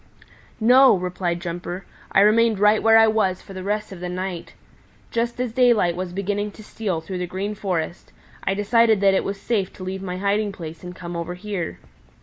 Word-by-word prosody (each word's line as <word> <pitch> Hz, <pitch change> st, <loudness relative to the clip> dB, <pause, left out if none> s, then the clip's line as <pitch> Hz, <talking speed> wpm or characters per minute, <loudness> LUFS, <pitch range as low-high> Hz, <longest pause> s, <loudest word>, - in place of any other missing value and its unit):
"No," 250 Hz, +2 st, +7 dB
replied 180 Hz, -1 st, -2 dB
Jumper. 175 Hz, +1 st, -5 dB, 0.3 s
"I 195 Hz, -, +5 dB
remained 220 Hz, +1 st, +4 dB
right 210 Hz, +2 st, +4 dB
where 225 Hz, 0 st, +6 dB
I 225 Hz, -, +7 dB
was 215 Hz, -4 st, +1 dB
for 195 Hz, -, -11 dB
the 190 Hz, -, -6 dB
rest 210 Hz, +2 st, -2 dB
of 190 Hz, -, -8 dB
the 180 Hz, 0 st, -4 dB
night. 180 Hz, -1 st, -5 dB, 0.6 s
Just 235 Hz, +1 st, -1 dB
as 250 Hz, -3 st, -2 dB
daylight 235 Hz, -9 st, +3 dB
was 180 Hz, 0 st, -4 dB
beginning 205 Hz, +2 st, -2 dB
to 215 Hz, -, -12 dB
steal 195 Hz, -6 st, -3 dB
through 185 Hz, +2 st, -5 dB
the 180 Hz, -, -2 dB
Green 195 Hz, +4 st, -3 dB
Forest, 180 Hz, -5 st, -3 dB, 0.3 s
I 195 Hz, -, 0 dB
decided 220 Hz, +1 st, +3 dB
that 195 Hz, -1 st, +5 dB
it 190 Hz, -, +2 dB
was 195 Hz, 0 st, -4 dB
safe 200 Hz, -5 st, -1 dB
to 185 Hz, -, -10 dB
leave 190 Hz, +1 st, -4 dB
my 180 Hz, -1 st, -4 dB
hiding 200 Hz, +1 st, 0 dB
place 165 Hz, -2 st, -9 dB
and 180 Hz, 0 st, -8 dB
come 175 Hz, -1 st, -7 dB
over 170 Hz, +1 st, -4 dB
here. 180 Hz, -, -4 dB
195 Hz, 200 wpm, -23 LUFS, 180-215 Hz, 0.6 s, No